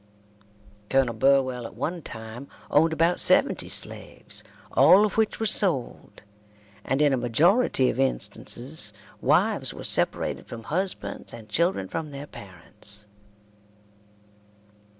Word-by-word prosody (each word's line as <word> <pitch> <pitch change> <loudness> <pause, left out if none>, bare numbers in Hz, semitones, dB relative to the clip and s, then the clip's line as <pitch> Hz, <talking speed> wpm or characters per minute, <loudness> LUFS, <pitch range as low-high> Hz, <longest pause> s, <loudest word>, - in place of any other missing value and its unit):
Colonel 135 -3 +2
Burwell 130 0 +2
at - - -15
one 165 +4 -3
time 115 +2 -9 0.2
owned 160 +3 +4
about 165 +2 +1
seventy - - +3
slaves, - - -3 0.3
all 200 +3 +6
of 210 - -3
which 220 -1 0
were 225 - -1
sold, 180 - -1 0.6
and 135 +3 +1
in 145 -2 +3
a - - +2
majority 135 - +2
of 125 - -7
instances 120 0 0 0.3
wives - - +1
were - - -8
separated - - +1
from 115 -1 -8
husbands 185 +8 -4
and 115 -2 -12
children 170 - 0
from 160 +7 -5
their 140 0 -8
parents. 100 - -9
135 Hz, 120 wpm, -25 LUFS, 115-165 Hz, 0.6 s, all